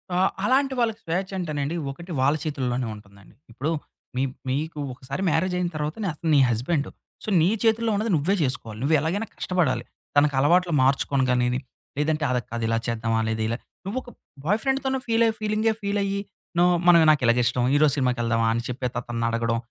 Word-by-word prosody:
ఆ! - - +2 0.3
అలాంటి 270 +3 +2
వాళ్ళకి 225 -2 0
స్వేచ్చ 185 +3 -2
అంటేనండి, 150 -3 -2 0.2
ఒకటి 170 +6 -10
వాళ్ళ 135 +3 +3
చేతుల్లోనే 130 -5 -2
ఉంటుందండి. 100 -2 -17 0.2
ఇప్పుడు 135 +7 -2 0.5
మీ 130 - +2 0.3
మీకు 150 +4 -2
ఒకసారి 135 +6 -6
మ్యారేజ్ 180 +4 +1
అయిన 180 -1 0
తర్వాత 150 +1 -2
నే - - 0
అతను 160 +1 -4
నీ - - +6
హస్బెండు. 135 +6 0 0.3
సో, - - -4
నీ 165 - +4
చేతుల్లో 225 0 +2
ఉన్నది 215 +2 0
నువ్వే 165 +7 +1
చేసుకోవాలి. 115 -5 -3
నువ్వెలాగైనా 160 +9 +1
కష్టపడాలి. 155 -10 0 0.3
తనకు 145 -1 +4
అలవాట్లు 175 +5 +3
మార్చుకోను 135 0 +2
గానిని, 125 0 +1 0.4
లేదంటే 155 +1 0
అలా 125 0 +1
కాదు 115 0 -3
ఇలా 115 0 +1
చేద్దామా! 115 -1 0
లేదా 110 0 -1
ఇలా 115 +1 -1 0.3
నువ్వొక 245 +6 -4 0.4
బాయ్ 210 +6 +2
ఫ్రెండ్‌తోను 265 0 0
ఫీల్ 230 0 +3
ఫీలింగే 215 +1 +1
ఫీల్ 200 0 -1
అయ్యి, 200 0 -1 0.4
నువ్వు 180 +1 +5
మనమ 170 -1 +8
నాకు 150 - +2
ఇలాగ 120 +1 +4
ఇష్టం. 120 +1 +1
ఈరోజు 145 -1 +4
సినిమాకి 125 -2 +1
వెళ్దామా? 115 -1 +1
అని 115 +1 -2
చెప్పేత 125 0 -3
అతన్ని 115 -1 -3
అడగడం. 115 0 0
150 Hz, 175 wpm, -25 LUFS, 125-185 Hz, 0.5 s, మనమ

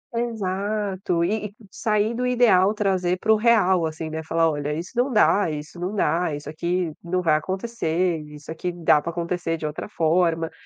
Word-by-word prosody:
Exato, 200 -5 -1
e 210 +3 -1
e 205 - -18 0.2
sair 215 +1 0
do 245 +2 -2
ideal 220 -6 +4
trazer 185 -3 0
pro 220 +3 +3
real, 210 -6 +3
assim, 155 0 -6
né, 160 0 -3
falar: 165 +1 +1
"Olha, 145 -1 -2
isso 165 +4 -4
não 250 +3 +1
dá, 205 -4 +4
isso 150 +3 -7
não 185 +4 -3
dá, 170 -5 +1
isso 145 0 -9
aqui 170 +1 -2
não 180 +1 -1
vai 160 -2 +3
acontecer, 185 -2 -1
isso 150 +1 -10
aqui 175 +2 -3
dá 165 -3 +3
pra 170 - -4
acontecer 170 0 -2
de 155 - -6
outra 150 +6 -5
forma." 165 -2 +1
180 Hz, 180 wpm, -23 LUFS, 160-205 Hz, 0.2 s, ideal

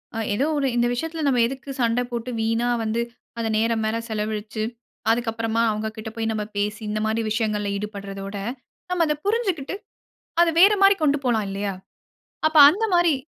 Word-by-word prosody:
அ - - -3 0.2
ஏதோ 255 +7 +1
1 280 -1 +1
இந்த 240 0 +3
விஷயத்துல 325 +5 -3
நம்ம 250 -3 +3
எதுக்கு 265 +2 -8
சண்ட 235 +1 +2
போட்டு, 235 +1 -4
வீணா 230 +2 +1
வந்து, 225 +1 0 0.4
அந்த 225 -1 -1
நேர 230 +1 +2
மேல 220 +1 0
செலவழிச்சு, 215 0 -3 0.5
அதுக்கப்புறமா 225 -1 0
அவங்க 215 +1 -2
கிட்ட 220 0 -5
போய் 225 -1 -1
நம்ம 215 -1 -2
பேசி, 210 +2 -1
இந்த 215 0 -1
மாரி 220 +1 0
விஷயங்கள்ல 215 -2 0
ஈடுபடுறதோட, 200 -1 -6 0.6
நம்ம 350 -2 +2
அதப் 300 0 -2
புரிஞ்சுகிட்டு, 385 - 0 0.7
அத 345 - +5
வேற 400 +4 +8
மாரி 395 0 +7
கொண்டு 290 -1 +3
போலாம் 220 -4 +1
இல்லயா? 195 0 -3 0.7
அப்ப 315 0 +1
அந்த 410 +9 0
மாரி, 345 -3 +4
230 Hz, 165 wpm, -23 LUFS, 215-280 Hz, 0.7 s, வேற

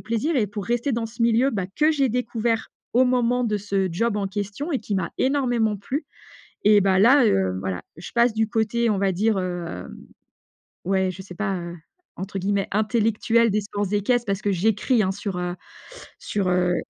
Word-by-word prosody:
plaisir 230 +9 -1
et 225 -5 +2
pour 205 0 -6
rester 240 +5 0
dans 230 -1 -1
ce 230 +1 -5
milieu, 235 +3 +3
bah, 195 -6 -2
que 305 +1 +4
j'ai 275 -3 +2
découvert 230 -1 -1 0.2
au 250 +2 +5
moment 250 0 +2
de 215 -2 0
ce 195 -1 -1
job 210 +6 0
en 200 -1 -1
question 205 - -4
et 275 - +1
qui 210 -1 -4
m'a 190 -3 -1
énormément 245 -6 +1
plu. 260 - -4 0.6
Et, 210 0 +6
bah, 190 -1 +3
là, 255 +7 +6
heu, 95 - +1
voilà 95 -2 -3
je 165 - -9
passe 235 -1 +3
du 220 0 +1
côté, 225 +1 +1
on 205 - +1
va 195 -1 +1
dire, 210 +3 +1
hem, 175 - -5 0.9
ouais, 190 0 +1
je 185 +1 -8
sais 185 -1 -11
pas, 195 0 -2
heu, 170 0 -6 0.4
entre 195 +2 -5
guillemets: 195 +1 0
«intellectuel» 225 +2 +2
des 210 +1 +1
sports 205 -1 -3
équestres, 235 +4 +1
parce 195 0 -2
que 205 - +1
j'écris, 215 +5 +2
hein, 190 - 0
sur, 200 -2 -4
heu, 180 0 -2 0.7
sur, 200 -3 -2
heu, 180 0 +2
210 Hz, 195 wpm, -23 LUFS, 190-235 Hz, 0.9 s, Et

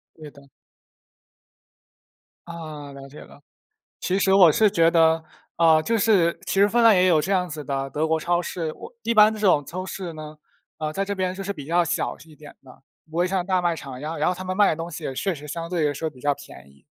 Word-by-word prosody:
对 155 -2 -11
的。 140 -1 -18 2.0
啊， 155 -4 -8
了 135 0 -11
解 145 - -13
了， - - -15 0.6
其 185 +2 0
实 190 -1 +2
我 185 -4 +7
是 215 +7 +3
觉 165 -4 +3
得， 160 -1 +3 0.3
啊， 160 -2 +4
就 230 +8 0
是 195 -6 +2
其 - - -3
实 200 +1 +5
芬 235 +3 +2
兰 225 -1 +7
也 185 -1 +4
有 160 -4 +4
这 180 +6 -3
样 185 -2 +1
子 150 -1 -6
的 135 0 -3
德 150 +3 -1
国 160 0 0
超 175 +2 0
市， 165 -3 -4
我 - - -12
一 230 +1 0
般 215 0 +6
这 215 - -8
种 180 -9 +3
超 185 +5 -6
市 185 -2 -6
呢， 155 -1 -10 0.4
呃， 155 -1 -3
在 195 +5 -2
这 200 0 -3
边 185 -1 -1
就 190 - -7
是 200 +1 -4
比 145 -7 -9
较 170 +3 +2
小 - - -2
一 160 -1 -17
点 150 -1 -14
的， 130 0 -18 0.3
不 160 - -12
会 175 +1 +2
像 185 -1 -1
大 185 -1 +1
卖 175 -1 +1
场 135 -5 -8
一 - - -11
样， 160 +2 -5
然 - - +1
后 180 - +1
他 185 - -7
们 185 0 -4
卖 205 -1 +5
的 - - +1
东 165 +2 -6
西 155 -1 -7
也 135 - -4
确 195 +7 -1
实 150 -1 -10
相 165 +2 -5
对 170 -3 0
来 145 - -1
说 160 +3 -3
比 135 -4 -18
较 145 +2 +1
便 70 - -14
宜。 70 -1 -24
165 Hz, 270 characters per minute, -23 LUFS, 150-185 Hz, 2.0 s, 我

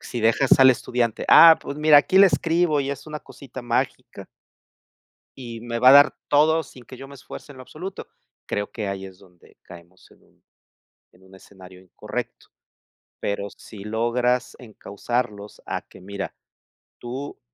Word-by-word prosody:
Si 120 - -7
dejas 115 +5 +3
al 130 0 +7
estudiante. 120 -2 -2
Ah, 165 -1 +8
pues 140 - -7
mira, 155 -1 +5
aquí 185 +6 +2
le 200 - +8
escribo 165 -4 0
y 140 0 -3
es 140 +2 -8
una 150 -1 -7
cosita 130 -2 -12
mágica. 120 -1 -4 1.1
Y 115 -3 -9
me 115 0 -5
va 125 +2 +6
a - - +8
dar 145 +1 +6
todo 160 +2 +3
sin 125 -3 -16
que 130 - -13
yo 135 +1 -11
me 140 - -13
esfuerce 140 +1 -12
en 130 - -16
lo - - -10
absoluto. 180 +8 -9 0.4
Creo 105 0 -4
que 105 -4 -5
ahí 95 0 -6
es 95 -1 -15
donde 90 -3 -22
caemos 85 +2 -17
en - - -24
un - - -32 0.7
en 95 - -25
un 95 0 -20
escenario 95 -1 -16
incorrecto. 95 - -8 0.7
Pero 100 0 -4
si 100 0 -13
logras 120 +3 -1
encausarlos 105 -2 -6
a - - -4
que - - -18
mira, 100 +1 -7 0.7
tú, 130 +4 -8
120 Hz, 170 wpm, -22 LUFS, 100-140 Hz, 1.1 s, Ah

